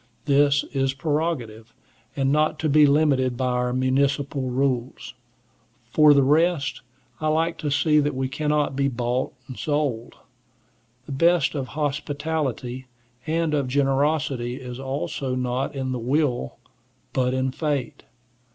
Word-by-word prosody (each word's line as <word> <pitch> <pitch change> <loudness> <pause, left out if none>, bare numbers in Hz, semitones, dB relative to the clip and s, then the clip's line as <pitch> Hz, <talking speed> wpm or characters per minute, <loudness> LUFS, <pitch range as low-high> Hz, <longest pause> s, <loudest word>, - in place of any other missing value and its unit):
This 145 0 +3
is 135 -1 0
prerogative, 135 -7 -3 0.4
and 135 -1 +1
not 150 +1 +2
to 155 - +1
be 150 +1 +6
limited 140 -4 +2
by 130 0 0
our 125 0 0
municipal 135 +1 0
rules. 130 -1 -2 0.8
For 150 -1 +6
the 140 - +5
rest, 150 0 +2 0.4
I 155 - -1
like 165 +2 0
to 150 - -2
see 150 +1 +3
that 145 -2 0
we 130 0 -1
cannot 150 0 0
be 140 0 +1
bought 125 0 -1 0.2
and 130 - -9
sold. 145 -6 -2 0.9
The - - -9
best 160 0 +3
of 135 -4 -3
hospitality 145 -3 -2 0.4
and 165 0 0
of 140 -3 0
generosity 135 -2 0
is 125 -1 -8
also 135 0 -3
not 125 +2 -2
in 130 -1 -2
the 125 - -2
will, 125 - -1 0.6
but 130 0 +1
in 130 0 0
fate. 145 -4 -3
140 Hz, 135 wpm, -24 LUFS, 130-150 Hz, 0.9 s, be